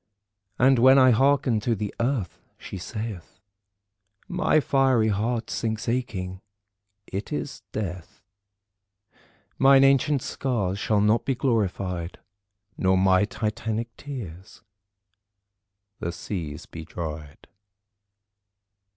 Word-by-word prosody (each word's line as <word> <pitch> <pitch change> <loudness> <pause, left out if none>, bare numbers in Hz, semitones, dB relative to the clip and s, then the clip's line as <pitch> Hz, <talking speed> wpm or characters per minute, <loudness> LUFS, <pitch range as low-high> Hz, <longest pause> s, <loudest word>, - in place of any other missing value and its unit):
And 130 0 +4
when 130 +3 +7
I 130 -1 +7
hearken 135 -1 +3
to 115 +2 0
the 105 0 -4
Earth 115 - -1 0.2
she 95 - -8
saith 105 -3 -7 0.9
My 180 -4 +2
fiery 130 -5 +2
heart 110 +3 -1
sinks 110 -1 -2
aching. 100 -7 -3 0.6
It 100 +8 -6
is 145 -4 -4
death. 90 -5 -5 1.4
Mine 135 0 +7
ancient 140 0 +3
scars 100 -8 -2
shall 105 0 +1
not 105 +2 +3
be 135 - 0
glorified 95 -8 -1 0.6
Nor 95 0 +3
my 95 +1 +4
titanic 110 +2 -3
tears 100 - -9 1.4
the 85 - -3
seas 85 -4 -6
be 80 - -9
dried." 75 -3 -7
110 Hz, 100 wpm, -25 LUFS, 95-130 Hz, 1.4 s, when